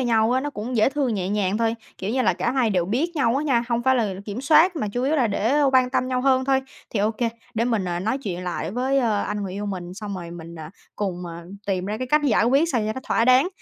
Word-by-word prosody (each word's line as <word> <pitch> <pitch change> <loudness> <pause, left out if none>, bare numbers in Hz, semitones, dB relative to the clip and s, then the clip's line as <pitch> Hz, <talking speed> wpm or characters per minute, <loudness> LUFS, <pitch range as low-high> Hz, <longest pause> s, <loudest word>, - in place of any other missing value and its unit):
nhau 230 -2 +2
á, 260 - +2
nó 290 +2 -3
cũng 240 0 -4
dễ 215 - +4
thương, 275 -5 0
nhẹ 185 -2 -2
nhàng 205 0 0
thôi. 230 0 +1 0.2
Kiểu 195 +3 -3
như 260 +1 +1
là - - +3
cả - - -1
hai 255 -5 +2
đều 180 -3 +1
biết 290 - -1
nhau 255 -3 +2
á 295 - -1
nha, 240 -5 +2
hông 235 0 0
phải 260 0 +3
là 210 -5 0
kiểm 210 +3 -5
soát 320 +5 +5
mà 215 -9 -1
chủ 245 +5 -3
yếu 285 +4 +1
là 255 -5 +3
để 230 +7 +1
quan 255 -1 +4
tâm 255 0 0
nhau 255 -1 0
hơn 260 -1 +3
thôi. 265 0 +2 0.3
Thì 210 - -1
ô 210 +2 +2
kê, 230 +1 -1 0.3
để 230 +1 +1
mình, 225 -6 0
ờ, 175 -1 -2
nói 225 +8 -1
chuyện 180 -8 -5
lại 175 -1 -3
với, 260 +4 0
ờ, 220 -5 +1
anh 210 0 -3
người 190 -2 -4
yêu 205 +2 -4
mình, 180 -2 -5
xong 210 -1 -6
rồi 175 -2 -7
mình, 170 -1 -9
à, 160 -2 -8 0.3
cùng, 180 -3 -3
à, 170 0 -8 0.2
tìm 185 -2 -1
ra 210 +2 -3
cái 255 - -3
cách 300 +3 +3
giải 230 -4 +3
quyết 275 +7 +3
sao 240 - +2
cho 215 - -1
nó 260 - -6
thỏa 230 - +2
đáng. 255 +6 +5
230 Hz, 290 wpm, -23 LUFS, 200-260 Hz, 0.3 s, soát